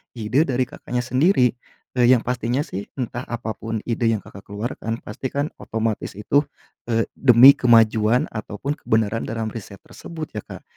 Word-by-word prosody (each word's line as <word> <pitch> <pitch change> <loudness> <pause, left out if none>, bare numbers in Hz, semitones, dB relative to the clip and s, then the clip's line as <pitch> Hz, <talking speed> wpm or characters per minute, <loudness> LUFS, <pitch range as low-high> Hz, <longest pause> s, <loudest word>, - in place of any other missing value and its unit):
ide 120 +7 +1
dari 130 -1 +1
Kakaknya 125 0 -4
sendiri. 130 - +3 0.4
Eee, 125 -1 +3
yang 125 -2 +5
pastinya 125 +2 -1
sih 100 - -7
entah 120 -2 -4
apapun 115 -2 -4
ide 115 0 -1
yang 110 -3 0
Kakak 100 0 -13
keluarkan, 115 +2 -5
pasti 105 +5 -5
kan 140 +3 -2
otomatis 110 -3 -3
itu, 140 +8 +1 0.4
eee, 115 -1 +1
demi 125 +1 +8
kemajuan 115 +1 +3
ataupun 115 +7 -5
kebenaran 110 0 0
dalam 110 -1 -3
riset 100 -3 -10
tersebut 160 -2 -9
ya 105 - -5
Kak. - - -10
115 Hz, 155 wpm, -22 LUFS, 110-130 Hz, 0.4 s, demi